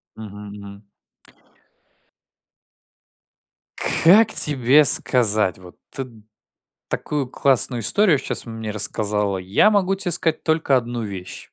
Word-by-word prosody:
Мгм, 105 Hz, -1 st, -11 dB
мгм. 100 Hz, 0 st, -13 dB, 2.9 s
Как 215 Hz, +6 st, +3 dB
тебе 145 Hz, -2 st, +3 dB
сказать? 110 Hz, -10 st, +3 dB
Вот 90 Hz, -1 st, -16 dB, 0.2 s
ты 135 Hz, -1 st, -7 dB, 0.8 s
такую 145 Hz, -4 st, -4 dB
классную 130 Hz, -2 st, 0 dB
историю 185 Hz, -, +2 dB
сейчас -, -, -6 dB
мне 110 Hz, -2 st, -7 dB
рассказала. 105 Hz, -1 st, -2 dB
Я 95 Hz, -, +1 dB
могу 195 Hz, -1 st, 0 dB
те 185 Hz, -2 st, -4 dB
сказать 165 Hz, -1 st, -1 dB
только 160 Hz, -4 st, +1 dB
1 120 Hz, -1 st, -5 dB
вещь. 95 Hz, -3 st, -8 dB
120 Hz, 105 wpm, -20 LUFS, 105-155 Hz, 2.9 s, Как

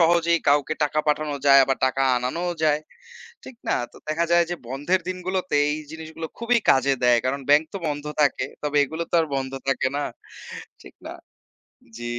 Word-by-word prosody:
সহজেই 170 Hz, 0 st, +3 dB
কাউকে 145 Hz, +2 st, +2 dB
টাকা 150 Hz, +1 st, -1 dB
পাঠানো 150 Hz, 0 st, 0 dB
যায় 140 Hz, 0 st, +8 dB
আবার 135 Hz, 0 st, -1 dB
টাকা 130 Hz, +1 st, 0 dB
আনানোও 165 Hz, +9 st, -2 dB
যায়। 150 Hz, -1 st, +2 dB, 0.6 s
ঠিক 250 Hz, -, -11 dB
না? -, -, +2 dB, 0.2 s
তো -, -, -17 dB
দেখা 160 Hz, +2 st, 0 dB
যায় 170 Hz, 0 st, +5 dB
যে 175 Hz, -, -2 dB
বন্ধের 145 Hz, +8 st, 0 dB
দিনগুলোতে 185 Hz, -2 st, -2 dB
এই 150 Hz, -, -1 dB, 0.2 s
জিনিসগুলো 160 Hz, 0 st, -7 dB
খুবই 235 Hz, +1 st, +2 dB
কাজে 135 Hz, +1 st, +3 dB
দেয়। 120 Hz, -1 st, +5 dB
কারণ 140 Hz, +2 st, -1 dB
ব্যাংক 150 Hz, +2 st, +6 dB
তো -, -, -2 dB
বন্ধ 145 Hz, 0 st, -4 dB, 0.2 s
থাকে। 140 Hz, -2 st, +1 dB, 0.2 s
তবে 150 Hz, 0 st, -2 dB
এগুলো 160 Hz, +4 st, -5 dB
তো -, -, -4 dB
আর 160 Hz, -, -3 dB
বন্ধ 135 Hz, 0 st, -3 dB, 0.2 s
থাকে 135 Hz, -1 st, +1 dB
না 145 Hz, -, -1 dB, 0.8 s
ঠিক -, -, -14 dB
না? -, -, -7 dB, 0.8 s
জি। 120 Hz, -, -7 dB
150 Hz, 180 wpm, -23 LUFS, 135-170 Hz, 0.8 s, যায়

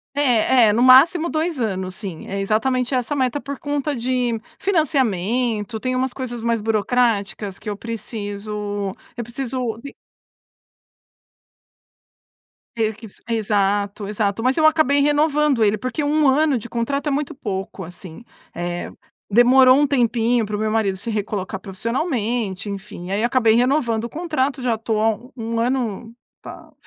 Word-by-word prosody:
É, 250 Hz, -3 st, +4 dB
é 210 Hz, -, +3 dB
no 230 Hz, -, +1 dB
máximo 305 Hz, +7 st, +6 dB
2 315 Hz, -1 st, -1 dB
anos, 190 Hz, -5 st, -2 dB
sim, 185 Hz, -4 st, -7 dB
é 195 Hz, -, -3 dB
exatamente 250 Hz, +5 st, 0 dB
essa 255 Hz, +3 st, -1 dB
meta 260 Hz, 0 st, 0 dB
por 280 Hz, -1 st, -7 dB
conta 290 Hz, 0 st, -2 dB
de 245 Hz, -1 st, -1 dB, 0.2 s
financiamento. 240 Hz, -, 0 dB
Tem 255 Hz, +2 st, -2 dB
umas 260 Hz, 0 st, 0 dB
coisas 240 Hz, -3 st, -5 dB
mais 230 Hz, -1 st, +1 dB
burocráticas 210 Hz, -2 st, 0 dB
que 215 Hz, -, -6 dB
eu 205 Hz, -, -4 dB
preciso 205 Hz, -3 st, -5 dB, 0.2 s
eu 240 Hz, -, -4 dB
preciso 240 Hz, -1 st, -3 dB
v 280 Hz, -, -8 dB, 2.8 s
Meio 220 Hz, -1 st, 0 dB
que 220 Hz, +2 st, -12 dB
você 195 Hz, -, -12 dB
exato, 205 Hz, -2 st, 0 dB
exato. 210 Hz, +1 st, -1 dB
Mas 255 Hz, +1 st, +2 dB
eu 315 Hz, -, +4 dB
acabei 310 Hz, -3 st, +4 dB
renovando 295 Hz, -3 st, +2 dB
ele 210 Hz, 0 st, +3 dB
porque 255 Hz, +6 st, -3 dB
1 295 Hz, 0 st, +2 dB
ano 285 Hz, +1 st, +3 dB
de 240 Hz, +1 st, -7 dB
contrato 275 Hz, +5 st, -2 dB
é -, -, +1 dB
muito 285 Hz, +1 st, -2 dB
pouco, 195 Hz, -6 st, -5 dB
assim, 175 Hz, +3 st, -11 dB, 0.3 s
eh. 175 Hz, 0 st, -4 dB, 0.4 s
Demorou 255 Hz, +4 st, +6 dB
um 290 Hz, -, +4 dB
tempinho 240 Hz, -3 st, +1 dB
para 210 Hz, 0 st, -4 dB
o -, -, -3 dB
meu 215 Hz, 0 st, 0 dB
marido 215 Hz, -3 st, +1 dB
se 190 Hz, +5 st, -6 dB
recolocar 205 Hz, -3 st, -3 dB
profissionalmente. 220 Hz, -, -2 dB
Enfim, 195 Hz, -2 st, -7 dB
aí 205 Hz, +4 st, +1 dB
acabei 235 Hz, -2 st, +3 dB
renovando 240 Hz, -2 st, +1 dB
o -, -, -5 dB
contrato. 295 Hz, -4 st, -2 dB
Já 245 Hz, -2 st, +1 dB
estou 220 Hz, -1 st, -2 dB
há 220 Hz, -1 st, +1 dB, 0.2 s
1 230 Hz, -1 st, -3 dB
ano, 230 Hz, -2 st, -2 dB, 0.3 s
tá, -, -, -11 dB
230 Hz, 150 wpm, -21 LUFS, 210-265 Hz, 2.8 s, máximo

